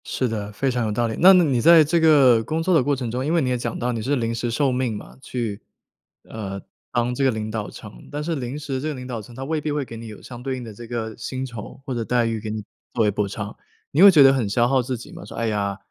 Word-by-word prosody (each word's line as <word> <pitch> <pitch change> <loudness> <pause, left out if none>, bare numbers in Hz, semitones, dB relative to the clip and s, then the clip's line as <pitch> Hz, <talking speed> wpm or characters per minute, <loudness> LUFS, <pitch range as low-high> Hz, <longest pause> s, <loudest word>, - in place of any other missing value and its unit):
是 130 - -1
的， 105 -2 -4
非 130 +6 -1
常 120 -2 -1
有 110 - -1
道 120 +3 0
理。 110 - -3
那 185 +3 +9
那 180 -1 +6
你 135 -6 +1
在 165 +3 +8
这 170 +3 +1
个 140 -8 +5
工 160 +7 -2
作 185 +2 +2
的 160 -6 +4
过 145 +1 +1
程 125 -4 -4
中 125 +2 -2
因 155 - 0
为 170 - +3
你 130 - 0
也 125 - +1
讲 120 - -4
到 125 +1 -1
你 115 -2 -3
是 135 +6 0
临 115 -3 -1
时 120 +1 -2
受 135 +3 +1
命 125 -4 -1
嘛， - - -11
去 115 -6 -4 0.7
呃， 100 -3 -6 0.3
当 120 +1 0
这 135 - -1
个 135 - +4
领 110 -2 -3
导 110 -2 -4
层。 - - -12
但 145 +1 -3
是 165 +1 -2
临 130 0 -4
时 140 -3 -4
这 155 - -3
个 155 - -2
领 125 -1 -8
导 120 -3 -5
层 115 +3 -13
它 130 - -6
未 155 +2 -2
必 150 - -2
会 145 -2 -1
给 115 - -9
你 115 0 -8
有 105 -2 -10
相 120 -1 -10
对 130 0 -3
应 125 - -7
的 110 -2 -8
这 115 +3 -10
个 110 -2 -4
薪 130 0 -4
酬 120 -1 -9
或 135 - -3
者 120 -2 -2
待 120 +1 +1
遇， 115 -1 -1
给 110 0 -6
你 105 0 -4 0.3
作 115 - +2
为 105 - +3
补 105 0 -1
偿， 100 +1 -6 0.4
你 150 - +2
会 200 - +11
觉 155 -7 +7
得 135 0 +7
很 120 -6 0
消 120 +3 +2
耗 135 0 +3
自 125 0 -3
己 115 - -11
吗？ - - -10
说： - - -10
“哎 115 - -1
呀， 100 -2 -1
125 Hz, 330 characters per minute, -23 LUFS, 110-135 Hz, 0.7 s, 会